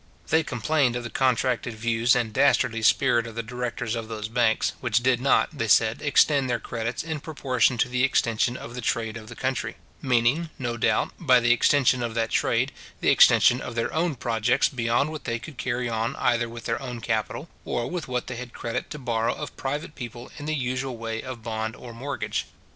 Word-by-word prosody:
They 160 +1 +5
complained 135 -2 +1
of 120 - -3
the 115 - -6
contracted 125 -2 +1
views 115 +2 +2
and 115 -3 -1
dastardly 115 -4 +3
spirit 120 +1 +3
of 115 - -9
the 115 - -3
directors 120 -1 -3
of 115 -2 -4
those 110 -1 -5
banks, 115 -1 +2
which 120 -1 +1
did 125 -1 +2
not, 140 +3 +2
they 115 -5 -2
said, 110 +1 +3
extend 145 -2 +3
their 120 -1 0
credits 115 0 -4
in 160 -1 -4
proportion 130 -5 0
to 115 - +2
the 125 +1 0
extension 120 -1 +1
of 120 - -9
the 125 - -5
trade 115 -1 -1
of 110 -1 -9
the 120 - -9
country; 130 -3 -2 0.3
meaning, 130 +4 +2
no 120 -4 -3
doubt, 115 - +1
by 125 -1 +5
the 120 0 +3
extension 125 0 +4
of 115 -1 -3
that 115 -1 0
trade, - - +1 0.3
the - - +2
extension 125 +2 +6
of 120 - -6
their 115 - -1
own 160 -1 0
projects 115 0 +1
beyond 120 +4 0
what 155 -2 -7
they 115 - -1
could 125 +3 -11
carry 125 -1 -1
on 115 0 -1
either 120 0 +1
with 115 0 -9
their 115 - -1
own 125 -3 -5
capital, 110 +7 -2 0.2
or 120 -1 -2
with 175 -4 -4
what 125 -1 -2
they 125 - -6
had 125 -1 -8
credit 115 - -4
to 150 - -6
borrow 115 -4 -1
of 150 - -7
private 145 +3 -4
people 120 -2 -8
in 145 - -7
the 155 - 0
usual 130 -1 -2
way 115 0 -4
of 125 -3 -8
bond 110 0 -3
or 120 -2 -10
mortgage. 135 +5 -3
120 Hz, 210 wpm, -25 LUFS, 115-130 Hz, 0.3 s, extension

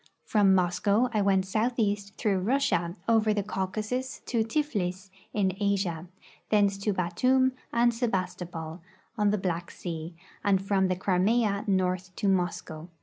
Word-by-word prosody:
From 200 -3 +4
Moscow 200 +6 +2
I 215 - +2
went 195 -1 +3
southeast 210 -1 -1
through 200 -3 +1
Russia, 185 -6 +1
over 220 -2 +3
the 205 - 0
Caucasus 215 +7 -3
to 230 -3 +1
Tiflis, 205 -8 -2 0.2
in 190 -3 0
Asia; 190 -5 -1 0.4
thence 200 -2 +3
to 210 +1 0
Batoum 255 +9 +2 0.2
and 235 0 +3
Sebastopol, 180 -7 -3 0.3
on 210 -3 +2
the 210 - +1
Black 175 -3 -2
sea, 165 -1 -6 0.3
and 200 -2 +3
from 195 0 +1
the 185 - 0
Crimea 200 +3 +1
north 185 -1 0
to 205 - -1
^Moscow. 175 -4 -1
195 Hz, 140 wpm, -28 LUFS, 180-215 Hz, 0.4 s, From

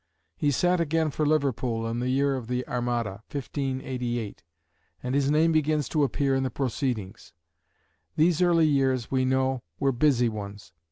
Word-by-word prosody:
He 145 - 0
sat 175 +5 +2
again 160 -1 +1
for 150 +1 -1
Liverpool 130 -6 0
in 115 +1 -2
the 125 +1 -1
year 140 +1 +2
of 125 -4 -6
the 125 +1 -2
Armada 120 -5 -2
(1588), 130 -5 -3 0.6
and 125 +1 -2
his 140 0 +2
name 155 +2 +3
begins 155 -2 +1
to 150 -2 +1
appear 140 0 +1
in 135 - +1
the 130 - -1
proceedings. 120 -5 -3 0.8
These 165 +2 +3
early 170 -2 +4
years, 135 -5 +1
we 130 -1 +2
know, 130 0 +1 0.2
were 135 - +2
busy 125 -1 +3
ones. 100 -4 -7
130 Hz, 160 wpm, -26 LUFS, 120-150 Hz, 0.8 s, early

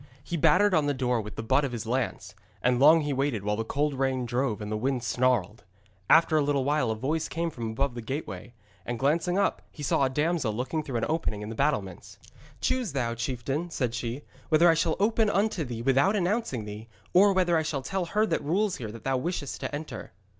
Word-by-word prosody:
He 175 - -4
battered 180 +6 +4
on 155 -4 +3
the 145 - 0
door 125 -3 0
with 105 0 -9
the 110 - -5
butt 140 +6 +2
of 135 - -2
his 115 -2 -4
lance; 125 +2 -2 0.3
and 125 0 +3
long 155 +4 +7
he 145 -1 -1
waited, 135 -6 -1
while 105 0 0
the 115 - -2
cold 145 +6 -1
rain 130 -1 0
drove 120 -2 -1
and 105 0 -6
the - - 0
wind 125 +2 -1
snarled. 120 -4 0 0.5
After 165 -1 +5
a 155 - +4
little 140 -2 +1
while 145 -4 +1
a 110 - 0
voice 150 +8 -1
came 165 0 -2
from 115 -5 -5
above 135 +4 -1
the 120 - -6
gateway, 120 - -6 0.3
and 120 - -4
glancing 165 +7 +1
up 200 - +1
he 150 - -10
saw 140 - +2
a 135 - +2
damsel 150 -4 0
looking 130 +7 -2
through 135 -4 -6
an 115 - 0
opening 150 -10 -2
in 105 - -6
the - - -5
battlements. 105 -10 -2 0.4
'Choose 250 - 0
thou, 120 -4 -1
chieftain,' 130 +7 -3
said 125 -8 -2
she, 120 +4 -4 0.3
'whether 160 +2 +5
I 165 - +7
shall 165 0 +1
open 220 +1 +2
unto 200 -4 +1
thee 120 -4 -5
without 135 - +3
announcing 185 - -1
thee, 105 +2 -8 0.3
or 200 +3 +6
whether 180 -3 +2
I 160 - +3
shall 145 -3 -3
tell 190 +4 -2
her 210 +5 +1
that 215 - -1
rules 190 +7 0
here 110 -4 -6
that 115 0 -11
thou 135 +1 +1
wishest 150 0 -3
to - - -4
enter.' 145 - -7
135 Hz, 225 wpm, -27 LUFS, 120-165 Hz, 0.5 s, long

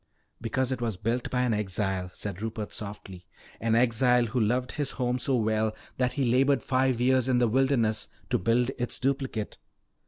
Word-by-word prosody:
"Because 130 +3 -1
it 130 -2 -2
was 115 -5 -1
built 115 +5 -1
by 125 0 +1
an 120 -2 +1
exile," 95 -2 -1
said 100 -2 -6
Rupert 110 -1 -4
softly. 95 -3 -8 0.3
"An 115 0 +1
exile 125 +1 +3
who 120 +2 -1
loved 125 +3 +1
his 145 -3 -2
home 125 -1 -1
so 130 +1 0
well 110 -1 +1 0.2
that 125 -1 +1
he 140 - 0
labored 130 +1 +3
five 130 -2 +1
years 130 0 +3
in 130 -1 +3
the 120 -1 +3
wilderness 120 -3 +1 0.2
to - - +2
build 120 +6 +2
its 120 - -1
duplicate. 130 -5 -2
120 Hz, 180 wpm, -28 LUFS, 110-130 Hz, 0.3 s, exile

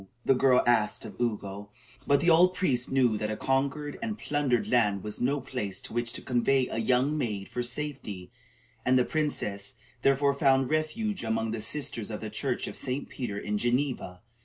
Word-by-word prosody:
the - - +5
girl 130 -1 +4
asked 115 -3 +2
of - - -8
Ugo; 105 -3 -3 0.4
but 140 0 +4
the 170 - +3
old 180 +3 +5
priest 125 -10 0
knew 125 -5 +3
that 105 - -2
a 110 - -3
conquered 140 +2 -1
and 220 -2 -3
plundered 140 - 0
land 105 -6 +2
was 105 -1 -3
no 140 +4 +1
place 105 -8 -4
to - - -7
which 120 0 -1
to - - -3
convey 130 +1 +2
a - - -2
young 130 +6 +2
maid 105 -9 -2
for 125 - -3
safety, 120 -8 -4 0.5
and 130 +1 +4
the 125 - +3
princess, 105 -10 -2 0.3
therefore, 140 +1 +3
found 135 -1 +2
refuge 185 - -1
among 110 0 -1
the 115 -1 -3
sisters 115 -2 0
of 105 - -4
the 110 -1 -6
church - - -2
of - - -6
St. 130 +3 -3
Peter 115 -6 -4
in 105 0 -2
Geneva. 120 -7 -1
125 Hz, 185 wpm, -28 LUFS, 110-140 Hz, 0.5 s, the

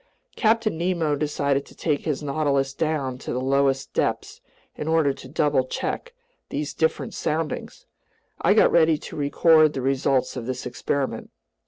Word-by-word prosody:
Captain 220 -6 +1
Nemo 170 -4 0
decided 140 -1 0
to - - -16
take 150 -3 -1
his 150 -1 -2
Nautilus 140 -2 0
down 140 -4 -2
to - - -6
the 125 - -1
lowest 135 0 +1
depths - - -2 0.3
in 150 - -5
order 160 -3 +3
to 135 - -12
double 140 -2 +1
check 485 - -4 0.3
these 145 +1 -3
different 160 - -1
soundings. 155 0 -3 0.6
I - - +4
got - - +5
ready 160 -2 +4
to - - -10
record 155 +1 +4
the 135 - -3
results 135 0 +1
of 120 -2 -5
this 130 -1 -4
experiment. 135 +2 -3
145 Hz, 155 wpm, -24 LUFS, 135-160 Hz, 0.6 s, got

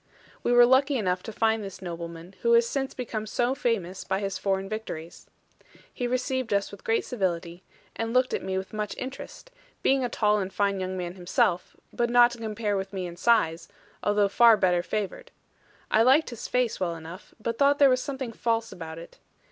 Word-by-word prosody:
We - - 0
were 245 0 +8
lucky 265 +3 +3
enough 185 -4 0
to 220 - -7
find 220 0 +1
this 195 -1 -8
nobleman, 170 0 -7
who 235 0 +3
has 235 0 +5
since 270 +1 -3
become 220 -4 -4
so 240 +4 0
famous 205 -9 -2
by 190 0 -1
his 195 -2 -3
foreign 195 0 -1
victories. 195 -6 -7 0.7
He 245 - -2
received 255 -2 -1
us 200 0 -1
with 200 - -12
great 225 - +1
civility; 175 -5 -2 0.3
and 225 0 -3
looked 255 +1 +2
at - - -1
me 190 0 -2
with 190 +2 -5
much 210 -1 -3
interest, 265 - -8 0.3
being 270 -1 +3
a 245 - -1
tall 210 -2 +2
and 190 -1 -3
fine 200 0 0
young 185 0 -3
man 175 -1 -4
himself, 180 0 0 0.2
but 240 -1 0
not 240 0 +6
to 240 - -9
compare 215 -2 -2
with 195 0 -4
me 190 -2 -3
in 170 -1 -7
size, 175 -6 +2 0.3
although 205 -1 +2
far 230 +2 +6
better 180 -3 +2
favoured. 215 - -4 0.6
I 220 - +5
liked 265 +5 +4
his 235 - -6
face 250 -2 0
well 175 -3 -1
enough, 165 +4 -11
but 230 +1 -3
thought 285 0 +4
there 285 - +7
was 255 -1 +3
something 265 -4 -5
false 230 0 -1
about 160 -2 -8
it. 165 - -12
215 Hz, 200 wpm, -27 LUFS, 185-240 Hz, 0.7 s, were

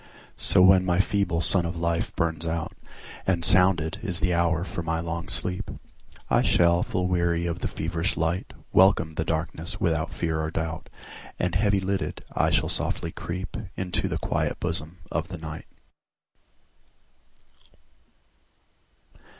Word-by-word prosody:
So 90 - +6
when 95 0 +6
my 90 -1 +1
feeble 95 -3 +1
sun 90 +1 +6
of 85 0 -4
life 85 0 -1
burns 85 -1 -1
out, 80 0 -3 0.6
And 85 -3 +1
sounded 90 -4 +4
is 90 -5 -1
the 90 -2 +1
hour 85 0 +1
for 90 - -5
my 80 0 -2
long 85 +1 -4
sleep,I 90 -2 -1
shall, 85 0 +3
full 90 -7 -1
weary 85 -1 0
of 85 0 -3
the - - -2
feverish 85 +3 -2
light, 80 +2 -1 0.2
Welcome 95 -4 +4
the 80 0 -2
darkness 80 +1 -3
without 80 -1 0
fear 80 -1 -2
or 80 - -2
doubt, 80 0 -4 0.5
And 90 -1 -1
heavy 100 +1 +2
lidded, 95 0 -3
I - - +2
shall - - +1
softly - - -1
creepInto 95 +1 -4
the - - -2
quiet - - -2
bosom 80 +5 -4
of 80 +1 -2
the 90 - -7
Night. 80 0 -8
85 Hz, 140 wpm, -25 LUFS, 80-90 Hz, 0.6 s, So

